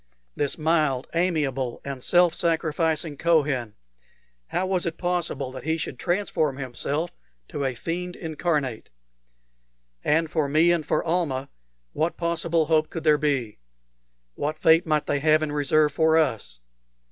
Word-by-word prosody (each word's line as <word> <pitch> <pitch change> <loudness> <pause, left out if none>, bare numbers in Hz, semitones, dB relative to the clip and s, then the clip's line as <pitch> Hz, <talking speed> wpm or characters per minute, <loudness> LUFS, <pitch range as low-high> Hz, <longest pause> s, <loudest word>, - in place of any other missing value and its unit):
This 145 -1 -1
mild, 155 -5 +1
amiable, 145 -8 0
and 135 -2 -6
self 175 -1 +4
sacrificing 160 -2 0
Kohen, 145 -9 +1 0.7
how 185 - -1
was 185 -2 0
it 165 - -4
possible 175 -7 -2
that 130 - -8
he 160 +1 0
should 140 -5 -5
transform 175 -6 0
himself 140 +5 -3 0.4
to 145 - -3
a 130 -2 -1
fiend 175 +7 -4
incarnate? 150 -7 -2 1.1
And 160 +2 +2
for 155 -3 -1
me 160 +4 +4
and 170 -2 +1
for 145 - 0
Almah, 155 -6 -1 0.4
what 160 +3 -1
possible 170 -1 +1
hope 155 0 +2
could 165 - -6
there 150 -2 +4
be? 135 - -1 0.7
What 150 - -3
fate 160 +2 +4
might 155 -1 +1
they 145 - 0
have 155 +1 +3
in 150 - -2
reserve 150 +1 +2
for 160 +1 +3
us? 110 - -1
155 Hz, 145 wpm, -25 LUFS, 140-165 Hz, 1.1 s, self